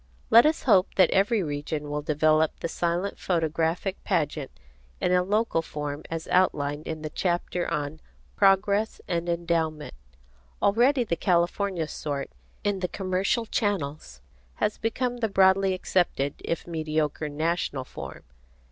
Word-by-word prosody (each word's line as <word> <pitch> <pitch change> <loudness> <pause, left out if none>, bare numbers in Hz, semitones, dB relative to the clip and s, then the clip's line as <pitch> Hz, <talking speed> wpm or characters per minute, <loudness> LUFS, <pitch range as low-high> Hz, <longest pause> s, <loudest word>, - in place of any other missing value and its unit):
Let 235 +5 +8
us 315 - 0
hope 195 -7 +3
that 185 -3 +5
every 200 +2 +2
region 150 0 -3
will 150 0 -1
develop 155 +1 +2
the - - -1
silent 175 +4 -2
photographic 165 +2 -1
pageant 150 -6 -1 0.5
in - - +1
a 180 0 +4
local 205 -2 +1
form 150 -2 -5
as 165 -1 -4
outlined 150 -5 +1
in 160 -1 -5
the 155 - -4
chapter 175 0 -1
on 150 -1 -3 0.4
Progress 200 +2 +3
and 170 0 -1
Endowment. 165 -3 -1 0.7
Already 245 +6 +3
the 185 -7 -1
California 175 -1 0
sort, 145 - -4 0.3
in 205 -2 0
the 180 - -1
commercial 190 +5 -1
channels, 155 - -2 0.3
has 210 - -1
become 245 +2 -1
the 225 -2 -1
broadly 190 -1 +4
accepted 175 -7 0
if 170 - -3
mediocre 155 -2 -2
national 155 -2 -1
form. - - -9
170 Hz, 135 wpm, -26 LUFS, 155-195 Hz, 0.7 s, Let